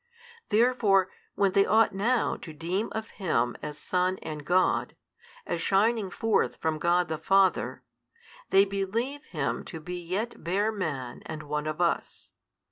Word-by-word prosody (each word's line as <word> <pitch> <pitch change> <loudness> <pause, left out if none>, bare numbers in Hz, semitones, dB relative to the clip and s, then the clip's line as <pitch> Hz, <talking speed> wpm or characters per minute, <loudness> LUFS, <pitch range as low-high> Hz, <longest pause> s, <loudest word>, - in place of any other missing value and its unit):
Therefore 210 -4 +3 0.2
when 195 -1 +3
they 195 +1 +5
ought 220 +1 +4
now 230 +5 +1
to 160 - -9
deem 175 +7 -2
of 220 0 -4
Him 120 -9 +1
as 150 -1 -6
Son 185 +2 0
and 150 -1 -6
God, 180 +5 +2 0.5
as 170 - -2
shining 205 +2 +2
forth 225 +4 +1
from 160 -1 -2
God 175 +2 +2
the 160 -1 -3
Father, 195 +3 +2 0.7
they 195 +1 +6
believe 225 +9 -2
Him 150 -5 -2
to 165 - -7
be 180 +3 -6
yet 195 +6 -3
bare 200 +6 +1
man 145 - -4
and 155 -1 -6
one 150 +1 -3
of 155 +1 -3
us. 175 -1 -1
185 Hz, 150 wpm, -28 LUFS, 160-205 Hz, 0.7 s, they